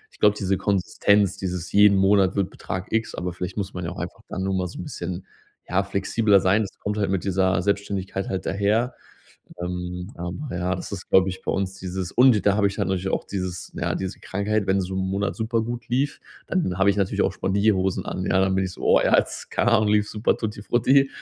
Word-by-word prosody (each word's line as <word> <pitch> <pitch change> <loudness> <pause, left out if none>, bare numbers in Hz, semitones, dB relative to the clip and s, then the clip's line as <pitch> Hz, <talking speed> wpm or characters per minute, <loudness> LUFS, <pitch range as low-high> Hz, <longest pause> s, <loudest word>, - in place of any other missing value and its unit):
ich - - -23
glaube, 105 0 +5
diese 95 -1 0
Konsistenz, 100 +1 +2
dieses 90 -2 -4
jeden 100 -1 +6
Monat 95 0 +4
wird 100 -2 0
Betrag 95 +1 -6
X, 110 0 -1
aber 90 0 -3
vielleicht 90 +3 -5
muss 100 -2 -3
man 90 - -5
ja 85 - -3
auch 90 - -8
einfach 90 +2 -6
dann 95 - -3
noch 95 0 0
mal 90 -1 0
so - - -10
'n - - -5
bisschen 90 +1 -5 0.4
ja 95 +2 +2
flexibler 100 +1 +2
sein. 95 +3 +3
Das 100 - -5
kommt 105 +1 -3
halt 100 -2 0
mit 95 -2 0
dieser 95 -1 +2
Selbstständigkeit 100 -1 -2
halt 95 - -3
daher. 105 +5 +1 0.7
Ähm, 90 +1 -4
aber 90 - -5
ja, 90 +1 -1
das - - -7
ist, 95 -1 -6
glaube 95 0 +4
ich, 95 - -7
bei - - -2
uns 95 0 -2
dieses 95 0 -4
und 130 0 +6
d 105 - +1
da 100 -1 +3
habe 105 -1 +3
ich 100 - -2
natürlich 95 0 -1
auch - - -1
dieses 90 -2 -5
ja, - - -1
diese 95 +1 -4
Krankheit, 100 +1 -1
wenn 95 0 +2
so 95 +1 -5
'n 95 - -1
Monat 100 +1 -1
super 115 0 0
gut 120 +1 -5
lief, 135 +4 0 0.3
dann 165 - 0
habe 95 +1 +4
ich 100 - -1
natürlich 100 -2 +1
auch - - +1
Spendierhosen 95 -1 +1
an, - - -4
ja, 95 - +2
dann 95 0 +2
bin 95 - +1
ich 90 - -6
so, - - -12
oh, - - +5
ja, - - +4
jetzt, - - -1
keine 120 - +2
Ahnung, 110 -2 +4
lief 105 0 +3
super, 105 +2 0
tutti 110 -2 -4
frutti, 135 +5 +3
95 Hz, 235 wpm, -24 LUFS, 95-105 Hz, 0.7 s, jeden